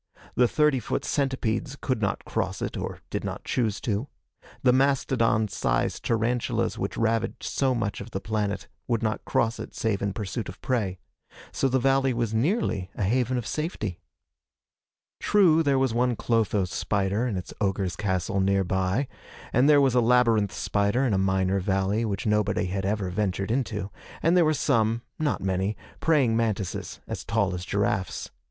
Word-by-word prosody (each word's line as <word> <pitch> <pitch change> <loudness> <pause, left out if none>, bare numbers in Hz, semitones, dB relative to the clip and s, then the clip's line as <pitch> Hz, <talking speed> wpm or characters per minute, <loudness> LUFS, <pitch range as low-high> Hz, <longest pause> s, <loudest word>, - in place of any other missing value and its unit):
The 125 - +4
thirty 150 0 +3
foot 115 - -3
centipedes 135 0 -1
could 130 -5 -1
not 100 - -1
cross - - -2
it - - -3
or - - -5
did - - -2
not - - -5
choose 110 -5 0
to. 110 +3 -1 0.6
The 125 -1 +5
mastodon 130 -5 +2
sized 100 - -1
tarantulas 115 +1 0
which - - -3
ravaged 115 0 0
so 130 -2 +1
much 105 -4 -2
of 100 - -8
the 95 - -3
planet 105 -1 -2 0.2
would 120 -2 0
not 110 -1 -1
cross 115 0 +1
it - - -8
save 110 -3 0
in 100 -1 -1
pursuit 105 0 -4
of 90 - -10
prey. 105 -8 -1 0.5
So 135 - +1
the 130 - +2
valley 135 0 +2
was 115 -2 -1
nearly 115 - 0
a - - -2
haven 125 +5 +1
of 120 - -3
safety. 110 - -3 1.2
True, 180 -6 +4
there 140 -4 +2
was 130 -3 +1
one 125 +1 +2
clotho 110 -4 +1
spider 100 +5 0
in 105 -6 -2
its 90 0 -6
ogre's 95 -3 0
castle 95 -1 -1
nearby, 95 +5 +1 0.5
and 130 +4 +4
there 145 -1 +7
was 135 -3 +3
a 125 - +4
labyrinth 115 -4 +3
spider 100 +6 +1
in 120 - +1
a 95 - +2
minor 95 0 +1
valley 95 +3 0
which 100 -3 -3
nobody 105 -3 +1
had 95 +1 -2
ever 100 -3 -1
ventured 100 +1 -1
into, 110 -6 -2 0.3
and 165 +2 +4
there 175 -2 +5
were 155 0 +2
some 115 -5 +1 0.2
not 150 -8 0
many 95 +2 0 0.2
praying 140 -8 +3
mantises 110 -5 -2
as - - -5
tall 100 -5 0
as 90 0 -4
giraffes. 100 -1 -1
110 Hz, 170 wpm, -26 LUFS, 100-125 Hz, 1.2 s, there